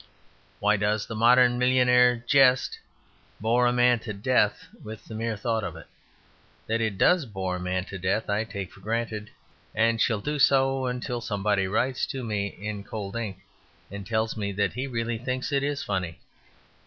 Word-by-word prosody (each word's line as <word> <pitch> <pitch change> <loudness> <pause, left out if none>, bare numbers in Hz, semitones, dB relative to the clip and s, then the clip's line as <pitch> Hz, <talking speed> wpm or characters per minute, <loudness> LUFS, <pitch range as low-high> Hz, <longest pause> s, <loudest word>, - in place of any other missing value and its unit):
Why 105 +1 +3
does 105 +1 0
the - - -7
modern 120 +2 +4
millionaire's 125 -1 +4
jest 130 -3 +4 0.6
bore 120 +3 +2
a - - +3
man 125 -1 +3
to 110 -1 -6
death 105 +1 +1 0.2
with 110 0 -9
the - - -10
mere 110 0 -3
thought 110 +1 -1
of - - -5
it? - - -11 0.8
That 115 +1 -1
it 110 -3 -1
does 170 - +3
bore 95 -3 -3
a - - -7
man 90 0 -2
to 95 -2 -8
death 95 +5 -1
I 105 +2 0
take 100 -3 -6
for - - -16
granted, 110 0 -3 0.5
and 115 0 +2
shall 110 -3 +2
do 150 +7 -3
so 135 -1 +3
until 125 -1 -3
somebody 105 -3 0
writes 120 +6 0
to 135 -2 -5
me 105 -3 -1
in 105 0 -6
cold 100 -1 -6
ink 105 -5 -4 0.5
and 100 0 -6
tells 110 +2 -1
me 100 -2 -3
that 100 -2 0
he 130 +2 -3
really 115 -2 -2
thinks 130 +3 -3
it 140 -1 +2 0.2
funny. 90 -5 -3
110 Hz, 180 wpm, -26 LUFS, 100-125 Hz, 0.8 s, modern